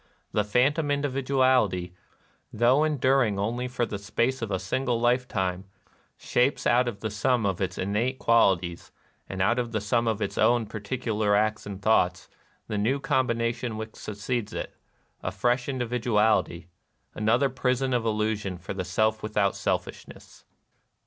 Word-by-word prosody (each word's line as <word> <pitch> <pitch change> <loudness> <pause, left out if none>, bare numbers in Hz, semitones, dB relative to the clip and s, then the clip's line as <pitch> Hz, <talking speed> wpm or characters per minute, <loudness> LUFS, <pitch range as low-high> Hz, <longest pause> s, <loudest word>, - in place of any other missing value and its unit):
The 105 - +1
phantom 135 +9 +1
individuality, 130 -9 +1 0.6
though 120 +6 +3
enduring 135 -7 +2
only 120 +5 -2
for 125 -1 -1
the 100 -3 -5
space 120 +6 -1
of 115 - -3
a 95 - 0
single 120 +6 -1
life 125 +1 +2
time, 95 0 -2 0.5
shapes 125 +3 0
out 125 +1 +3
of 105 -4 -5
the 110 - -3
sum 120 +1 +1
of 95 -2 -1
its 90 -1 -2
innate 110 +7 -1
qual 115 -7 +4
ities, 85 0 -8 0.4
and 95 -1 -1
out 120 +6 +2
of 120 -1 -3
the 110 - +1
sum 115 +3 0
of 110 -2 0
its 100 -2 -3
own 120 -1 +3
particu 110 +2 -4
lar 105 -1 +2
acts 105 0 0
and 100 -1 -7
thoughts, 90 -6 +2 0.4
the 105 - -2
new 125 +7 +1
combination 120 -4 -1
which 110 0 -7
succeeds 105 +2 -4
it, - - -5 0.3
— - - -42
a - - -3
fresh 120 +2 0
individuality, 110 -8 0 0.2
— - - -46
another 115 +6 +2
prison 130 0 0
of 120 -2 +1
illusion 105 -3 -1
for 90 +3 -6
the 95 -1 -3
Self 110 +5 0
without 105 -2 0
selfishness. - - -5
115 Hz, 160 wpm, -26 LUFS, 100-125 Hz, 0.6 s, qual